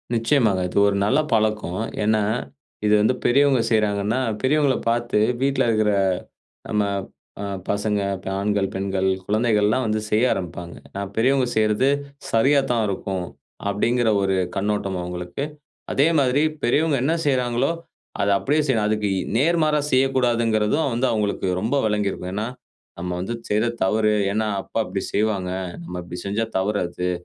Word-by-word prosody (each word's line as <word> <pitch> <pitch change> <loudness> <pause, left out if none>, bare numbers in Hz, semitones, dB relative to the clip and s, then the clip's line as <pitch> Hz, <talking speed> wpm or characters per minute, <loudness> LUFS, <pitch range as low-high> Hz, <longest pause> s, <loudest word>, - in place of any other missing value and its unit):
நிச்சயமாக. 115 -5 +2
அது - - -5
ஒரு 100 - +1
நல்ல 105 - +3
பழக்கம். 105 -4 0 0.2
ஏன்னா, 110 0 +2 0.6
இது 105 - +4
வந்து 110 - +3
பெரியவங்க 135 -1 +4
செய்றாங்கன்னா, 105 +1 +1 0.2
பெரியவங்கள 140 0 +3
பாத்து 120 -2 +1 0.2
வீட்ல 140 0 +2
இருக்குற 110 -1 +2 0.8
நம்ம 105 -1 +1 0.6
அ - - -3 0.2
பசங்க, 105 0 0 0.2
ப - - -19
ஆண்கள், 100 -1 +1
பெண்கள், 95 0 -1 0.2
குழந்தைகள்லாம் 110 +2 +2
வந்து 110 0 0
செய்ய 110 +3 +2
ஆரம்பிப்பாங்க. 85 -1 -6 0.2
நா 100 - -3
பெரியவங்க 130 +3 +3
செய்யுறது 110 +4 +2 0.4
சரியாதான் 125 -1 +3
இருக்கும். 95 -1 -3 0.5
அப்டிங்கிற 120 +3 +1
ஒரு 95 -1 +1 0.2
கண்ணோட்டம் 100 -1 -1
அவுங்களுக்கு. 90 +7 -5 0.5
அதே 140 +3 +3
மாதிரி 135 +1 +2 0.2
பெரியவங்க 145 +4 +2
என்ன 150 +5 +2
செய்றாங்களோ, 125 0 +1 0.5
அத 100 - +2
அப்டியே 150 +3 +1
செய்யணும், 115 -5 +2
அதுக்கு 105 -1 0
இ - - 0 0.2
நேர்மாறா 155 +1 +2
செய்ய 130 +1 +4
கூடாதுங்கிறதும் 115 +3 +1
வந்து 125 +3 +1
அவங்களுக்கு 105 -3 -1
ரொம்ப 115 +6 0
வெளங்கியிருக்கும். 105 -3 -1
ஏன்னா 105 +3 -2 0.5
"நம்ம 90 - -4
வந்து 115 +6 -3
செய்றது 110 +3 +1
தவறு, 105 +2 +2 0.2
ஏன்னா 110 +1 0
அப்பா 115 - -2
இப்டி 95 - -3
செய்வாங்க, 100 -3 0 0.3
நம்ம 90 +1 -6
இப்டி 90 +1 -7
செஞ்சா 105 +3 -1
தவறு 100 +2 0
அது, 90 +1 -3
110 Hz, 140 wpm, -22 LUFS, 100-125 Hz, 0.8 s, இது